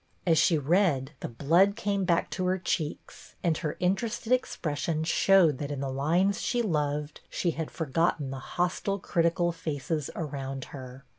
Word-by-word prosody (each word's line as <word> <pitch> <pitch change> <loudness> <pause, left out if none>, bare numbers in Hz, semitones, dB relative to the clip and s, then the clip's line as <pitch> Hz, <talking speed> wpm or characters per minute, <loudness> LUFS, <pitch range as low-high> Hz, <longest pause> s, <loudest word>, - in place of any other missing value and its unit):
As 165 -3 +4
she 165 0 +4
read 150 -3 +2
the - - -4
blood 170 +11 +3
came 200 -4 -1
back 170 -2 +1
to 185 - -2
her 185 +1 +2
cheeks, 165 -4 -4
and 170 -3 +2
her 150 - -3
interested 220 +6 0
expression 155 - -1
showed 170 -3 +4
that 145 - -3
in 145 -2 -4
the 135 -1 -2
lines 170 +9 +1
she 235 +3 0
loved 150 -5 -1
she 175 - 0
had 160 0 -4
forgotten 160 -2 0
the 135 - -5
hostile, 180 +6 -1
critical 170 -1 +1
faces 155 -2 -3
around 135 -4 -4
her. 130 -1 -9
165 Hz, 160 wpm, -28 LUFS, 145-185 Hz, -, As